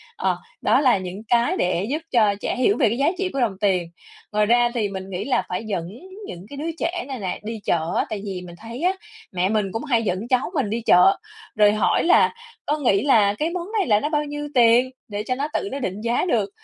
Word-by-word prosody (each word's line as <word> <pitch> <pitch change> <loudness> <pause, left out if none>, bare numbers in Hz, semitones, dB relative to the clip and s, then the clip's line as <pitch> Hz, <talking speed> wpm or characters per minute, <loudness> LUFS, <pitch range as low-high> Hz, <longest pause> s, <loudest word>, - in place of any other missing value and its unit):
ờ, 455 - 0 0.2
đó - - +3
là 255 -7 +4
những 185 +2 -6
cái 240 - +2
để 180 +1 0
giúp 290 - 0
cho 215 -4 +3
trẻ - - -2
hiểu 255 +11 +2
về 245 -7 +3
cái 230 - -2
giá 275 - +2
trị 380 0 -1
của 275 - -2
đồng 215 -6 0
tiền. 185 -4 +1 0.4
Ngoài 210 0 +2
ra 240 +2 +4
thì 220 -5 -1
mình 190 -1 -7
nghĩ 190 +1 -4
là 275 - +1
phải 180 +4 -3
dẫn 185 -6 -3 0.4
những 180 - -9
cái 285 - -9
đứa 320 +3 -3
trẻ 350 +1 -2
này 265 -3 -5
nè 190 -3 -3
đi 220 +1 -5
chợ 165 0 0
á, - - +1
tại 210 -2 -4
vì 190 -3 -4
mình 175 -1 -11
thấy 230 +4 -8
á, 365 +2 +2 0.4
mẹ 185 0 0
mình 210 -3 0
cũng 225 - -4
hay 240 -6 +1
dẫn 195 +2 -2
cháu 255 +5 +1
mình 270 - 0
đi 230 +2 -2
chợ, 180 +2 +6 0.4
rồi 210 -1 +5
hỏi 215 - +2
là 350 - +4 0.3
"Con 300 0 -1
nghĩ 200 -6 +3
là 215 -8 +4
cái 305 +10 -1
món 350 0 -4
này 390 - 0
là 210 -3 +4
nó 295 - -2
bao 300 -1 0
nhiêu 295 0 -5
tiền?" 245 0 +5 0.2
Để 205 -1 -4
cho 255 - -1
nó 280 +3 -2
tự 200 - -1
nó 275 - -4
định 200 -5 -4
giá 235 +8 0
được. 220 - +1
225 Hz, 255 wpm, -22 LUFS, 200-275 Hz, 0.4 s, chợ